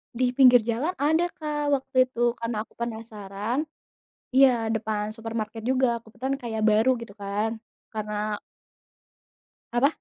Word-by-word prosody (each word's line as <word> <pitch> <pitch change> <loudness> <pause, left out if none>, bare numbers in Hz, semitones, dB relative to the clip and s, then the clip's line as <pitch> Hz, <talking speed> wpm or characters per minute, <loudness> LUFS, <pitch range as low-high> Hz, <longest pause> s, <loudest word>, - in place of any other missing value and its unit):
Di 250 0 +2
pinggir 250 -3 +7
jalan 245 +11 -1
ada, 320 +5 +2
Kak, 295 -3 -1
waktu 260 -1 +2
itu. 240 -1 +1
Karena 230 -2 -2
aku - - -29
penasaran 225 +3 -3 0.7
iya, 250 -4 +5
depan 215 -1 -1
supermarket 225 -1 -5
juga. 250 -2 +1
Kebetulan 255 +5 -3
kayak 230 -5 -4
baru, 230 +4 +4
gitu 230 -3 -10
kan. 205 +2 -2 0.3
Karena 210 -1 -3 1.4
Apa? 270 +5 +4
235 Hz, 125 wpm, -26 LUFS, 220-260 Hz, 1.4 s, pinggir